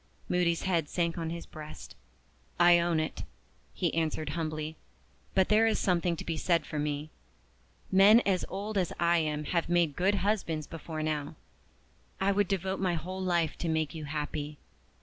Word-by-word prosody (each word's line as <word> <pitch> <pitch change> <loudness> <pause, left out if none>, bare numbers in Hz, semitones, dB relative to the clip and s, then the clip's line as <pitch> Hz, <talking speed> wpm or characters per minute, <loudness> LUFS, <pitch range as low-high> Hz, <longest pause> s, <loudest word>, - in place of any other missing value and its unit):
Moody's 175 -2 +1
head 170 -6 0
sank 170 -1 -1
on 165 -1 -2
his 170 0 -5
breast. 155 -1 -10 0.6
"I 175 0 +7
own 170 -1 +1
it," 155 - -3 0.5
he - - -1
answered 155 -2 -1
humbly. 155 0 -3 0.6
"But 190 -1 +3
there 220 +1 +5
is 220 - +2
something 175 -2 +1
to - - -7
be 165 -1 -2
said 170 -2 +1
for 150 - -4
me. 150 +1 -2 0.8
Men 200 +4 +8
as 190 -5 +1
old 205 +2 -2
as 180 - 0
I 170 0 +4
am 150 -1 -1
have 170 +2 -1
made 170 -4 +2
good 195 +3 +2
husbands 170 -7 0
before 160 0 -6
now. 150 -2 -2 0.8
I 195 +1 +2
would 200 0 +2
devote 190 -1 -1
my 185 -2 +1
whole 185 +4 -5
life 170 -4 +1
to 170 - -2
make 160 -2 0
you 155 -2 -6
happy. 150 0 -4
170 Hz, 170 wpm, -30 LUFS, 155-185 Hz, 0.8 s, Men